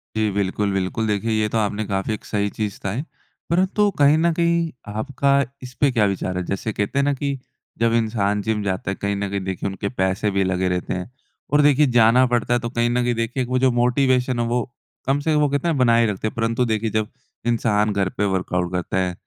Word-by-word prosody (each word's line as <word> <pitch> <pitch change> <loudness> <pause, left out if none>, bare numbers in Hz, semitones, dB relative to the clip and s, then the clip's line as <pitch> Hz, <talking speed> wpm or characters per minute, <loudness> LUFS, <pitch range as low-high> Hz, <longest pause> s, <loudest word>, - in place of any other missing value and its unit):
जी 110 -1 +1
बिल्कुल, 100 +1 -1
बिल्कुल। 95 +4 -1
देखिए, 105 +2 -1
ये 110 -1 +1
तो 115 - -1
आपने 105 0 0
काफ़ी 95 +2 -1
एक - - -7
सही 100 -1 -1
चीज़ 105 -2 -3
कहा 95 - -2
है। 140 +7 -3 0.4
परंतु 190 +4 +2
कहीं 145 +2 +6
न 170 +1 +3
कहीं 170 -1 +1 0.2
आपका 135 +6 -1 0.3
इसपे 130 +2 0
क्या 115 -4 +3
विचार 95 -2 -2
है? 90 - -1
जैसे 100 +2 -3
कहते 105 +7 -1
हैं - - +3
ना 145 0 +2
कि 140 0 -2 0.4
जब 115 0 +2
इंसान 105 -3 +1
जिम 105 -1 -1
जाता 95 0 -2
है - - -3
कहीं 100 0 -2
न 100 0 -2
कहीं 100 0 -2
देखिए 95 +1 -3
उनके 100 +1 -4
पैसे 95 -1 0
भी 100 0 +1
लगे 95 0 0
रहते 90 0 -2
हैं 90 +5 -5 0.4
और 150 - +6
देखिए, 145 0 +5
जाना 120 +1 +5
पड़ता 120 0 0
है 120 - +3
तो 120 0 -4
कहीं 120 -1 0
न 120 0 +1
कहीं 120 0 +1
देखिए 115 +3 -1
वो 130 +1 0
जो 130 -1 +3
मोटिवेशन 125 0 +2
है 120 - +1
वो 120 +1 +1 0.5
कम 140 +1 +2
से 155 +2 0
कम 150 - +3
वो 145 -1 +3
कहते 145 +4 -1
है 165 - +2
बनाए 115 -3 +4
रखते 105 0 -2
हैं। - - -6
परंतु 115 +2 0
देखिए, 110 0 0
जब 110 0 -1 0.4
इंसान 105 -3 +2
घर 95 -2 0
पे 105 - +1
वर्कआउट 90 -1 -1
करता 90 +1 -2
है 90 -1 0
115 Hz, 235 wpm, -22 LUFS, 100-130 Hz, 0.5 s, कहीं